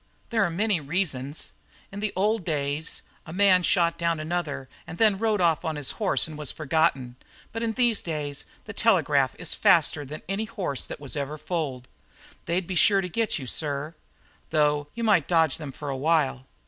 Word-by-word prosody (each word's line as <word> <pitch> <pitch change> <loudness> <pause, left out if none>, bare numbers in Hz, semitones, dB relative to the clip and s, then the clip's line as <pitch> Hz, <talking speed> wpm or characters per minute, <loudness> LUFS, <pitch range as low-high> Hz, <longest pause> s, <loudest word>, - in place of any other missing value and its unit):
"'There 225 -2 +3
are 185 - +1
many 200 +2 +1
reasons. 145 -3 -2 0.4
In 200 - -6
the 210 -1 -1
old 210 +2 +1
days 150 -1 -1 0.2
a - - -7
man 185 0 +5
shot 170 -1 +2
down 170 -1 +1
another 155 -4 -3 0.2
and 165 - -7
then 210 -2 +4
rode 220 -2 +1
off 165 -2 +3
on 160 -2 -2
his 145 -3 -1
horse 195 - +1
and 155 -1 -9
was 150 -4 -2
forgotten, 135 -5 0 0.3
but 225 - -4
in 230 -1 0
these 240 -2 +2
days 150 -4 -4 0.2
the 220 - -7
telegraph 150 - +3
is 175 -3 -2
faster 160 -3 +3
than 150 +2 -8
any 195 +4 -1
horse 195 - -3
that - - -7
was 145 -1 -6
ever 145 +1 -3
foaled. 145 -7 -3 0.6
They'd 175 +2 0
be 185 - -4
sure 195 +2 +5
to 180 - -4
get 220 +5 0
you, 135 - -6
sir, 145 +3 -2 0.6
though 150 -2 +2
you 235 - -3
might 200 -9 +4
dodge 165 -5 +3
them 150 -3 -6
for 145 +2 -7
a - - -2
while. 135 -3 +1
165 Hz, 190 wpm, -26 LUFS, 145-195 Hz, 0.6 s, man